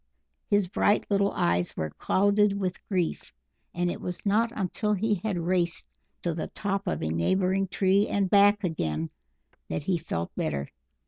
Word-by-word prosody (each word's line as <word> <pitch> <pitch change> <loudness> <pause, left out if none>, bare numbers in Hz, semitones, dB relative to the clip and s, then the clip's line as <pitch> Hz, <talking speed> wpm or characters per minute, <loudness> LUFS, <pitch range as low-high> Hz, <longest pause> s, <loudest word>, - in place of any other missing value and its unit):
His 205 -2 +2
bright 205 +2 +2
little 200 0 +3
eyes 85 +1 0
were 80 -1 -2
clouded 200 - +2
with 185 -2 -3
grief, 180 -5 -1 0.4
and 175 0 0
it - - -6
was 180 +2 -5
not 220 +3 +2
until 210 +2 -1
he 210 +2 +1
had 210 -5 -1
raced 175 0 0 0.4
to 170 - 0
the 160 - -3
top 200 -1 -3
of 175 - -1
a 80 - -1
neighbouring 185 - +1
tree 195 +2 +2
and 200 -1 +1
back 205 +2 +5
again 80 - -2 0.6
that - - -2
he 175 +1 0
felt 85 - -4
better. 70 -1 -2
185 Hz, 165 wpm, -27 LUFS, 165-200 Hz, 0.6 s, back